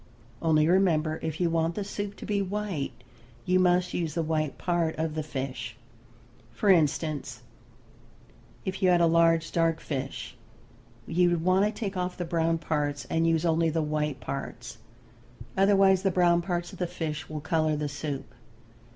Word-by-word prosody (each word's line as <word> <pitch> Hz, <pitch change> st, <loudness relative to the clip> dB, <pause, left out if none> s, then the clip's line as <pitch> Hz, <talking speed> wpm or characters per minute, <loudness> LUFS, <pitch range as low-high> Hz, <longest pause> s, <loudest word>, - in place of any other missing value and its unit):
Only 155 Hz, -2 st, +3 dB
remember 165 Hz, -4 st, +2 dB
if 160 Hz, -1 st, -4 dB
you 175 Hz, -2 st, +1 dB
want 165 Hz, 0 st, 0 dB
the 210 Hz, -, -2 dB
soup 205 Hz, 0 st, -5 dB
to -, -, -9 dB
be 205 Hz, -1 st, 0 dB
white 195 Hz, -6 st, -3 dB, 0.5 s
you 185 Hz, +1 st, +3 dB
must 180 Hz, 0 st, +3 dB
use 165 Hz, -3 st, -2 dB
the 165 Hz, -, 0 dB
white 155 Hz, -2 st, -1 dB
part 170 Hz, -2 st, 0 dB
of 160 Hz, 0 st, -1 dB
the 155 Hz, -, -2 dB
fish. 130 Hz, -5 st, -5 dB, 0.8 s
For 195 Hz, -, +3 dB
instance, 155 Hz, -3 st, 0 dB, 1.2 s
if 190 Hz, +1 st, -4 dB
you 185 Hz, -, +4 dB
had 175 Hz, -1 st, +5 dB
a 170 Hz, -, +5 dB
large 165 Hz, 0 st, +3 dB
dark 165 Hz, -1 st, +1 dB
fish 130 Hz, -4 st, -5 dB, 0.7 s
you 175 Hz, +1 st, +2 dB
would 170 Hz, -2 st, 0 dB
want 185 Hz, +3 st, +4 dB
to 210 Hz, -, +1 dB
take 205 Hz, -3 st, -4 dB
off 180 Hz, 0 st, -2 dB
the 175 Hz, -, -3 dB
brown 165 Hz, 0 st, +1 dB
parts 145 Hz, -3 st, -2 dB
and 165 Hz, 0 st, +2 dB
use 165 Hz, 0 st, +2 dB
only 165 Hz, 0 st, +2 dB
the 160 Hz, 0 st, 0 dB
white 150 Hz, -2 st, -1 dB
parts. 120 Hz, -3 st, -6 dB, 0.8 s
Otherwise 195 Hz, -1 st, +4 dB
the 195 Hz, -, +2 dB
brown 175 Hz, -1 st, +3 dB
parts 175 Hz, -1 st, -3 dB
of -, -, -11 dB
the 180 Hz, -, 0 dB
fish 160 Hz, -3 st, -4 dB
will 155 Hz, -1 st, -4 dB
color 155 Hz, 0 st, +1 dB
the 150 Hz, 0 st, -2 dB
soup. 145 Hz, -1 st, -5 dB
165 Hz, 170 wpm, -28 LUFS, 155-180 Hz, 1.2 s, had